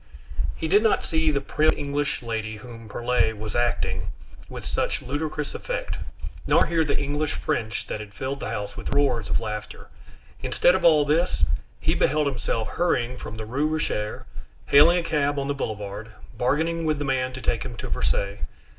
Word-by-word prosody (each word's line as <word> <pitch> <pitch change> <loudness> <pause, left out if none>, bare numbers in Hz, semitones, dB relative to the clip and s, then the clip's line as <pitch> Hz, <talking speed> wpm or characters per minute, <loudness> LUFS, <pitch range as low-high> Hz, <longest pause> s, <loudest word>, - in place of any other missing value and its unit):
He 160 - -2
did 200 +6 +5
not 220 -1 +3
see 160 -1 +2
the 145 -2 +2
prim 155 +2 +2
English 145 -1 -1
lady 110 -2 -3
whom 115 0 -10
Perlet 120 -1 +1
was 110 0 -5
acting 120 0 0 0.4
with - - -7
such - - -1
ludicrous 150 +2 -3
effect, - - -3 0.5
nor - - +5
hear 165 -1 +2
the 145 -2 +1
English 145 +1 -1
French 110 -1 -2
that - - -4
had 105 -1 -8
filled 135 +6 -4
the - - -4
house 105 0 -4
with - - -3
roars 130 -6 +2
of - - +2
laughter; 105 -1 -6 0.5
instead 175 - +4
of 190 -1 0
all 155 -4 +6
this, 160 +5 +2 0.4
he - - +1
beheld 150 +1 +2
himself 120 -4 -1
hurrying 125 -8 +1
from 110 -3 -7
the 110 - -5
Rue 135 +7 0
Richer, 150 -9 -2 0.4
hailing 160 +5 +7
a 175 - 0
cab 145 -3 +1
on 140 0 -1
the 145 - +1
Boulevard, 105 -4 -4 0.3
bargaining 160 +7 +1
with 155 -2 +1
the 145 - -2
man 130 -1 +1
to 130 - -6
take 120 - 0
him 120 -3 -5
to - - -5
Versailles. 100 +1 0
140 Hz, 180 wpm, -25 LUFS, 115-155 Hz, 0.5 s, hailing